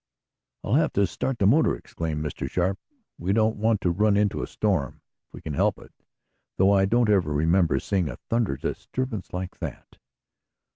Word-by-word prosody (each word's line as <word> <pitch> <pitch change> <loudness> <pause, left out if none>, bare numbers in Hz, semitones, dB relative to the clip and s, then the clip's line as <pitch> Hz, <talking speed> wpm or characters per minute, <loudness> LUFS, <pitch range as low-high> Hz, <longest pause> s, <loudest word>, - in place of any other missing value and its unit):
"I'll 105 - -2
have 155 +4 +3
to 100 - +3
start 130 +7 -3
the 100 - +1
motor!" 145 +11 +4
exclaimed 80 -2 -4
Mr. 75 - -4
Sharp. 95 +2 0 0.4
"We 95 +3 0
don't 110 +1 +2
want 110 0 +1
to 90 - +1
run 105 +3 +2
into 105 -1 +1
a - - -3
storm, 95 -10 -1 0.3
if - - -49
we - - -10
can 80 - -5
help - - +1
it, - - -16 0.6
though 95 +1 +4
I 95 -1 +4
don't 120 +4 +2
ever 95 -7 +2
remember 80 +4 +2
seeing 95 -6 -1
a 65 - -6
thunder 115 - 0
disturbance 115 - -4
like 90 0 -5
that." - - -8
100 Hz, 185 wpm, -25 LUFS, 85-110 Hz, 0.6 s, motor